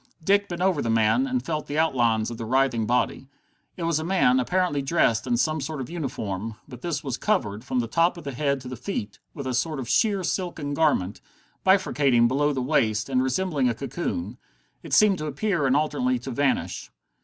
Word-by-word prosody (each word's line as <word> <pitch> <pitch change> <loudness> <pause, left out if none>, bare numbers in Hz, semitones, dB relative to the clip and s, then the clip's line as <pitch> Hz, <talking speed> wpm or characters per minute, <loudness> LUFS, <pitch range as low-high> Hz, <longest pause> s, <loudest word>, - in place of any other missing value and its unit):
Dick 200 +3 +2
bent 175 0 -3
over 185 -6 +2
the 115 - -2
man, 115 - +3
and 255 -1 -2
felt 155 -2 -3
the 145 - -3
outlines 120 -8 +2
of 115 - -7
the 115 - -4
writhing 125 -2 +1
body. 125 +2 0 0.5
It 175 - -4
was 165 -2 +1
a - - -3
man, 165 -8 +3
apparently 180 +1 0
dressed 135 -6 +1
in 120 - +1
some 155 +5 0
sort 150 +2 -4
of 130 +3 -6
uniform, 115 - -4
but 125 -3 -11
this 170 -2 -3
was 135 -3 -3
covered, 110 - -1
from 130 -1 -1
the 115 - -4
top 170 +7 +2
of 170 - -9
the 140 - -4
head 140 +1 0
to 125 - -9
the 130 - -5
feet, 120 - -5 0.2
with 140 - -6
a 130 - -2
sort 140 +4 -1
of 125 - -5
sheer 200 - +2
silken 170 -5 -2
garment, 140 - +1 0.4
bifurcating 140 -11 +3
below 145 +4 +1
the 130 -3 -2
waist, 110 -6 +1
and 130 -1 +2
resembling 135 0 0
a 115 - -1
cocoon. 170 - -4 0.4
It - - -8
seemed 205 -3 +5
to 155 - -3
appear 150 0 0
and 130 - +3
alternately 145 -4 +1
to 125 +2 -7
vanish. 140 +2 -1
140 Hz, 210 wpm, -25 LUFS, 125-170 Hz, 0.5 s, seemed